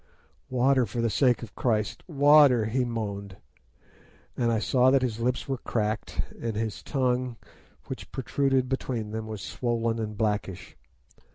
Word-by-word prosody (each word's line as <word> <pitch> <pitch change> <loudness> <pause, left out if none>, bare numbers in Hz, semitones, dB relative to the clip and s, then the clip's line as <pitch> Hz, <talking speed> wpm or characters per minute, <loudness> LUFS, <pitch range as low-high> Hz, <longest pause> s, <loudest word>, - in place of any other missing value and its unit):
"'Water! 130 0 +3
for 110 +5 -5
the 115 -1 +1
sake 125 +2 +2
of 110 - -9
Christ, 110 -4 -1
water!' 145 -6 +6
he 125 +4 0
moaned 100 -5 -4 1.0
and 120 -1 +1
I 115 - +2
saw 125 +3 +3
that 135 -1 +3
his 115 -3 -2
lips 120 +1 -1
were 135 -2 -2
cracked, 110 -2 -2 0.2
and 115 -2 -2
his 110 -1 -3
tongue, 125 -3 -1 0.5
which - - -8
protruded 135 0 0
between 125 -5 -3
them, 110 0 -4
was 110 -2 -6
swollen 115 -2 -1
and 105 -2 -4
blackish. 105 -4 -2
120 Hz, 150 wpm, -27 LUFS, 110-130 Hz, 1.0 s, water